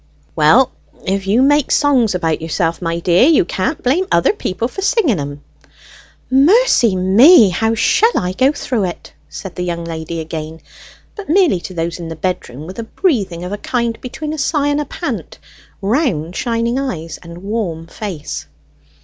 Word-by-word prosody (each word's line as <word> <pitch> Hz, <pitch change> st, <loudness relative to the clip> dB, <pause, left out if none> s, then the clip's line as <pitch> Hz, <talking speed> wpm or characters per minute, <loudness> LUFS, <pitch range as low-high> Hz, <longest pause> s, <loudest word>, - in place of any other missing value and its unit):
"Well, 190 Hz, +13 st, +4 dB, 0.3 s
if 195 Hz, 0 st, -1 dB
you 225 Hz, +6 st, +3 dB
make 290 Hz, 0 st, +3 dB
songs 255 Hz, -9 st, +2 dB
about 165 Hz, -3 st, -1 dB
yourself, 165 Hz, +1 st, -1 dB
my 165 Hz, -1 st, -2 dB
dear, 175 Hz, +8 st, +4 dB
you 310 Hz, -, +4 dB
can't 190 Hz, -, -2 dB
blame 325 Hz, +10 st, +1 dB
other -, -, +3 dB
people 230 Hz, -, -3 dB
for 390 Hz, -, -7 dB
singing 390 Hz, -, +2 dB
'em." 145 Hz, 0 st, -6 dB, 0.9 s
"Mercy 275 Hz, -, +4 dB
me! 210 Hz, -, +6 dB
how 225 Hz, +5 st, 0 dB
shall 450 Hz, -, +3 dB
I 180 Hz, -, -1 dB
go 265 Hz, +7 st, +3 dB
through 245 Hz, -8 st, -2 dB
it?" 175 Hz, -, -7 dB, 0.2 s
said 190 Hz, -3 st, -8 dB
the -, -, -6 dB
young 170 Hz, -1 st, -3 dB
lady 165 Hz, 0 st, -5 dB
again, 160 Hz, 0 st, -6 dB, 0.6 s
but 410 Hz, -6 st, -9 dB
merely 340 Hz, -, +3 dB
to 185 Hz, +1 st, -9 dB
those 170 Hz, +1 st, -3 dB
in 170 Hz, -, -6 dB
the 165 Hz, -, -6 dB
bedroom, 155 Hz, -5 st, -4 dB
with 185 Hz, +6 st, -9 dB
a -, -, -3 dB
breathing 195 Hz, -, 0 dB
of 180 Hz, -, -5 dB
a 205 Hz, -, -4 dB
kind 235 Hz, -1 st, -2 dB
between 300 Hz, +5 st, -5 dB
a 310 Hz, -, -5 dB
sigh 290 Hz, 0 st, +1 dB
and 290 Hz, +1 st, 0 dB
a -, -, -4 dB
pant, -, -, -5 dB, 0.5 s
round 195 Hz, -, 0 dB
shining 235 Hz, +1 st, -1 dB
eyes, 165 Hz, -, -5 dB
and 170 Hz, +1 st, -11 dB
warm 195 Hz, -6 st, -3 dB
face. 150 Hz, -, -6 dB
195 Hz, 175 wpm, -17 LUFS, 170-270 Hz, 0.9 s, me